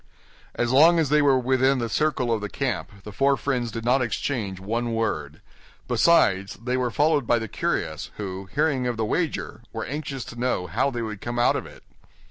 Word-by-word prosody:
As 120 Hz, 0 st, 0 dB
long 160 Hz, +6 st, +6 dB
as 160 Hz, -4 st, +2 dB
they 150 Hz, +1 st, +4 dB
were 140 Hz, -2 st, +4 dB
within 130 Hz, +1 st, +2 dB
the 120 Hz, -2 st, -1 dB
circle 130 Hz, -1 st, 0 dB
of 110 Hz, -, -1 dB
the 105 Hz, -, -4 dB
camp, 100 Hz, -, -4 dB
the 105 Hz, -, -8 dB
four 135 Hz, +6 st, +2 dB
friends 125 Hz, -4 st, -1 dB
did 115 Hz, +1 st, -6 dB
not 130 Hz, +2 st, +3 dB
exchange 110 Hz, -5 st, -2 dB
one 115 Hz, +4 st, -2 dB
word; 75 Hz, -10 st, -2 dB, 0.5 s
besides, 100 Hz, -, +3 dB
they 125 Hz, +3 st, -3 dB
were 125 Hz, -1 st, 0 dB
followed 145 Hz, 0 st, +2 dB
by 120 Hz, -, +4 dB
the 110 Hz, -1 st, -3 dB
curious, -, -, -2 dB
who, 95 Hz, -2 st, -6 dB
hearing 145 Hz, -4 st, +1 dB
of 120 Hz, -2 st, -2 dB
the 110 Hz, -, 0 dB
wager, 155 Hz, -3 st, -2 dB
were 115 Hz, -, -4 dB
anxious 140 Hz, -3 st, -5 dB
to 120 Hz, -, -9 dB
know 125 Hz, -7 st, 0 dB
how 90 Hz, -, 0 dB
they 120 Hz, -3 st, -4 dB
would 105 Hz, -3 st, -6 dB
come 120 Hz, 0 st, -4 dB
out 120 Hz, -, +3 dB
of -, -, -3 dB
it. -, -, -15 dB
120 Hz, 205 wpm, -24 LUFS, 110-135 Hz, 0.5 s, long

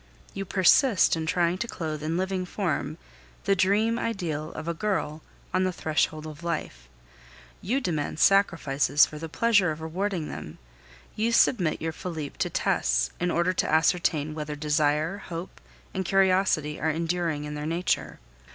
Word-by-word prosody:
You 195 Hz, -, -4 dB
persist 195 Hz, +3 st, +4 dB
in 160 Hz, -1 st, -3 dB
trying 175 Hz, +2 st, +1 dB
to 235 Hz, -, -2 dB
clothe 155 Hz, -7 st, -4 dB
in 160 Hz, +2 st, -1 dB
living 190 Hz, 0 st, -1 dB
form 180 Hz, -2 st, -2 dB, 0.5 s
the 195 Hz, -, +2 dB
dream 210 Hz, +5 st, +2 dB
ideal 165 Hz, -8 st, -3 dB
of -, -, -7 dB
a 170 Hz, -, 0 dB
girl 160 Hz, -5 st, -2 dB, 0.3 s
on 185 Hz, -, +2 dB
the 185 Hz, -, +1 dB
threshold 155 Hz, -2 st, -1 dB
of 155 Hz, +1 st, -9 dB
life; -, -, -4 dB, 0.7 s
you 250 Hz, +8 st, 0 dB
demand 160 Hz, -, -2 dB
sacrifices 160 Hz, -8 st, +4 dB
for 150 Hz, -, -9 dB
the 165 Hz, +1 st, -6 dB
pleasure 205 Hz, 0 st, +3 dB
of 155 Hz, 0 st, -4 dB
rewarding 170 Hz, +1 st, -2 dB
them; 75 Hz, -, -8 dB, 0.6 s
you 225 Hz, +2 st, +1 dB
submit 185 Hz, -9 st, +3 dB
your 160 Hz, -, -1 dB
Felipe 160 Hz, -3 st, -6 dB
to -, -, 0 dB
tests -, -, +1 dB
in 175 Hz, -, 0 dB
order 170 Hz, +2 st, +1 dB
to -, -, 0 dB
ascertain 155 Hz, -1 st, +2 dB
whether 150 Hz, -1 st, -5 dB
desire, 150 Hz, +4 st, +1 dB
hope, 175 Hz, -1 st, -8 dB, 0.3 s
and 190 Hz, -, -1 dB
curiosity 185 Hz, -5 st, +2 dB
are 160 Hz, -, +1 dB
enduring 165 Hz, -1 st, -1 dB
in 150 Hz, 0 st, -5 dB
their 150 Hz, 0 st, -4 dB
nature. 170 Hz, +3 st, -1 dB
165 Hz, 160 wpm, -26 LUFS, 155-190 Hz, 0.7 s, persist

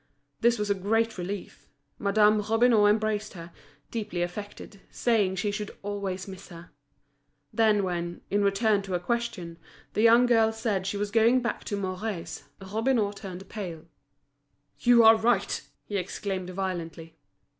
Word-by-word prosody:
This 235 Hz, 0 st, +3 dB
was 210 Hz, -1 st, -1 dB
a -, -, +5 dB
great 220 Hz, +2 st, 0 dB
relief. 195 Hz, +3 st, -6 dB, 0.3 s
Madame 210 Hz, +1 st, +3 dB
Robineau 225 Hz, 0 st, +4 dB
embraced 215 Hz, 0 st, 0 dB
her, 170 Hz, -2 st, -10 dB, 0.4 s
deeply 205 Hz, -6 st, -2 dB
affected, 200 Hz, +2 st, -8 dB
saying 210 Hz, -6 st, +1 dB
she 205 Hz, +2 st, -1 dB
should 210 Hz, 0 st, -6 dB
always 200 Hz, -2 st, -4 dB
miss 190 Hz, -1 st, -10 dB
her. 170 Hz, -1 st, -12 dB, 0.8 s
Then 215 Hz, -3 st, +3 dB
when, 175 Hz, -2 st, -3 dB
in 205 Hz, +1 st, +2 dB
reply 200 Hz, +1 st, +2 dB
to 195 Hz, -2 st, -4 dB
a -, -, 0 dB
question, 180 Hz, -5 st, -3 dB, 0.3 s
the -, -, 0 dB
young 230 Hz, +2 st, +6 dB
girl 225 Hz, -2 st, +3 dB
said 215 Hz, -4 st, -2 dB
she 200 Hz, -, -2 dB
was 205 Hz, 0 st, -2 dB
going 230 Hz, +3 st, +4 dB
back 235 Hz, -, -3 dB
to 205 Hz, -, -3 dB
Mouret's, 185 Hz, -3 st, -4 dB
Robineau 215 Hz, +2 st, 0 dB
turned 190 Hz, -2 st, -9 dB
pale. 175 Hz, -7 st, -7 dB, 0.9 s
"You 240 Hz, -1 st, +6 dB
are 225 Hz, 0 st, +9 dB
right!" 235 Hz, +2 st, +1 dB, 0.2 s
he 205 Hz, -, -3 dB
exclaimed 185 Hz, 0 st, -4 dB
violently. 170 Hz, -3 st, -5 dB
205 Hz, 145 wpm, -27 LUFS, 185-220 Hz, 0.9 s, are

